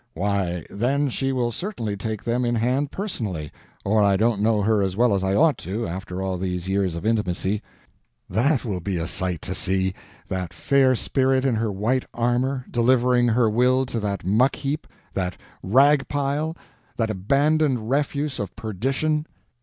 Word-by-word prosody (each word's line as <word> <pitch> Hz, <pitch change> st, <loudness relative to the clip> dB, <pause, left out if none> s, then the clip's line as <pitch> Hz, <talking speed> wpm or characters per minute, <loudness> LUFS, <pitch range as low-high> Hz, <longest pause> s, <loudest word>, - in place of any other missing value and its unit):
Why, 90 Hz, -3 st, -1 dB
then 135 Hz, +7 st, 0 dB
she 135 Hz, +2 st, -1 dB
will 125 Hz, -2 st, 0 dB
certainly 115 Hz, -, -4 dB
take 110 Hz, +1 st, -4 dB
them 120 Hz, +1 st, 0 dB
in 120 Hz, 0 st, +1 dB
hand 130 Hz, +5 st, +1 dB
personally, 105 Hz, -, -4 dB, 0.3 s
or 105 Hz, +2 st, +3 dB
I 100 Hz, -1 st, +4 dB
don't 110 Hz, 0 st, +1 dB
know 110 Hz, -1 st, +2 dB
her 110 Hz, 0 st, +3 dB
as 95 Hz, -1 st, -1 dB
well 120 Hz, -2 st, +4 dB
as 95 Hz, -1 st, 0 dB
I 95 Hz, +1 st, +1 dB
ought 150 Hz, -2 st, +4 dB
to, 100 Hz, +7 st, -3 dB
after 90 Hz, +1 st, -5 dB
all 95 Hz, -1 st, -2 dB
these 90 Hz, -1 st, -3 dB
years 95 Hz, -3 st, 0 dB
of 85 Hz, -, -6 dB
intimacy. 105 Hz, -2 st, 0 dB, 0.7 s
That 130 Hz, +4 st, +1 dB
will 100 Hz, -5 st, -2 dB
be 95 Hz, +1 st, -2 dB
a 80 Hz, -, -1 dB
sight 85 Hz, 0 st, -1 dB
to -, -, -2 dB
see—that 95 Hz, -1 st, -3 dB
fair 130 Hz, +6 st, +3 dB
spirit 130 Hz, +2 st, +1 dB
in 130 Hz, -, +2 dB
her 110 Hz, -1 st, 0 dB
white 115 Hz, +7 st, 0 dB
armor, 125 Hz, +2 st, 0 dB
delivering 125 Hz, 0 st, +3 dB
her 115 Hz, 0 st, +3 dB
will 125 Hz, +4 st, +3 dB
to 120 Hz, -2 st, -3 dB
that 100 Hz, -5 st, -3 dB
muck 115 Hz, +8 st, +3 dB
heap, 150 Hz, +1 st, -3 dB, 0.3 s
that 90 Hz, -2 st, -2 dB, 0.2 s
rag 135 Hz, +7 st, +4 dB
pile, 145 Hz, +3 st, -1 dB, 0.4 s
that 110 Hz, -2 st, 0 dB
abandoned 140 Hz, +4 st, +1 dB
refuse 140 Hz, +1 st, -1 dB
of 100 Hz, -3 st, -5 dB
perdition." 135 Hz, -, -1 dB
115 Hz, 170 wpm, -23 LUFS, 95-130 Hz, 0.7 s, I